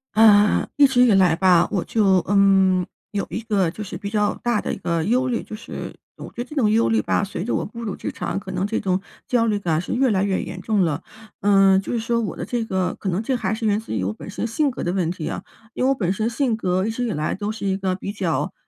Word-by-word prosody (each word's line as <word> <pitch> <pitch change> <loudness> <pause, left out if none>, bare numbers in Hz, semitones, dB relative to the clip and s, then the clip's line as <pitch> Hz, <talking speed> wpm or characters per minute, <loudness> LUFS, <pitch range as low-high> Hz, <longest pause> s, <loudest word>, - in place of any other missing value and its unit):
呃， 210 -1 +5
一 285 -1 +7
直 250 -2 +2
以 250 - +6
来 185 -4 +4
吧， 180 -1 +4
我 190 -4 -1
就， 195 -4 +3
嗯， 195 -2 +4 0.3
有 200 -1 -2
一 225 - -4
个 205 -6 +1
就 210 +6 -7
是 195 - -7
比 200 - -5
较 210 -1 +1
大 240 -3 +1
的 - - -3
一 - - -5
个 170 -1 -1
忧 250 +8 +1
虑， 240 -2 -1
就 215 - -8
是 230 - -7 0.2
我 - - -9
觉 240 - -6
得 - - -4
这 300 - -11
种 225 -8 +2
忧 225 +1 +3
虑 225 - +2
吧， - - 0
随 195 -3 -4
着 235 - -2
我 - - -1
步 235 +3 -8
入 210 -4 -4
职 - - -4
场， 180 +2 -3
可 190 - -11
能 185 +1 -1
这 215 +2 -1
种 185 -2 0 0.3
焦 240 -2 +2
虑 210 -2 0
感 165 -5 0
是 - - -7
越 260 +1 +2
来 195 -3 +1
越 195 -1 0
严 185 0 -7
重 215 -1 0
了。 150 -3 -2 0.4
嗯， 195 -1 +5
就 - - -6
是 235 - 0
说 235 +1 0
我 215 - -4
的 - - -4
这 240 -2 -2
个 185 -4 -1
可 195 - -3
能 180 +3 -1
这 255 +3 -1
还 235 - -1
是 225 +1 -3
源 210 -1 +2
自 220 - -6
于 95 -4 -1
我 100 - -1
本 110 - -10
身 210 +3 -3
性 275 +5 0
格 240 - -5
的 175 - 0
问 175 -3 0
题 170 -4 -5
啊。 - - -4 0.3
因 - - -2
为 265 - +3
我 - - +4
本 190 -8 -1
身 215 +3 -1
性 240 0 0
格 185 -2 0
一 - - -1
直 230 +2 -3
以 235 - -1
来， 155 -4 -2
都 205 +2 -3
是 215 -2 -4
一 190 - +1
个 190 -1 -1
比 195 +2 -5
较 170 -5 -1
205 Hz, 305 characters per minute, -22 LUFS, 185-225 Hz, 0.4 s, 一